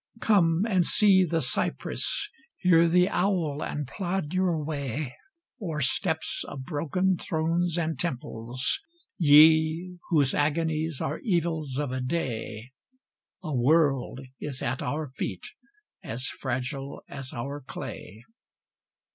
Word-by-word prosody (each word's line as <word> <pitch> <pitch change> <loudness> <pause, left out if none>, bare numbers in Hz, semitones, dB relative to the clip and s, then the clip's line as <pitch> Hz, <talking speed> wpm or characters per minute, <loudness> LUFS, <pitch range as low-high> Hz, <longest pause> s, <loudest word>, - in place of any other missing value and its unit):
Come 180 -4 +3
and 190 -5 +3
see 195 0 +5
The 165 -1 0
cypress, - - -1 0.3
hear 170 -2 +5
the 180 +2 +4
owl, 180 -7 0
and 150 -3 -3
plod 180 0 -3
your 185 -3 +2
way 140 -3 -3 0.5
O'er 160 -6 -3
steps 160 +4 0
of 135 - -7
broken 175 +5 0
thrones 165 +2 0
and 160 -1 -1
temples, 125 -5 -1 0.4
ye! 160 +3 +5
Whose 145 -5 +3
agonies 155 0 0
are 150 - -2
evils 165 - -1
of 145 -3 -1
a 130 0 -2
day 125 -5 -3 0.7
A 155 -4 -3
world 135 0 +2 0.2
is 135 -3 -4
at 125 +2 -1
our 150 -2 -3
feet 95 - -4 0.6
as 125 +3 -4
fragile 135 +2 -4
as 135 -2 -6
our 140 +4 -5
clay. 120 -5 -8
155 Hz, 120 wpm, -27 LUFS, 135-170 Hz, 0.7 s, see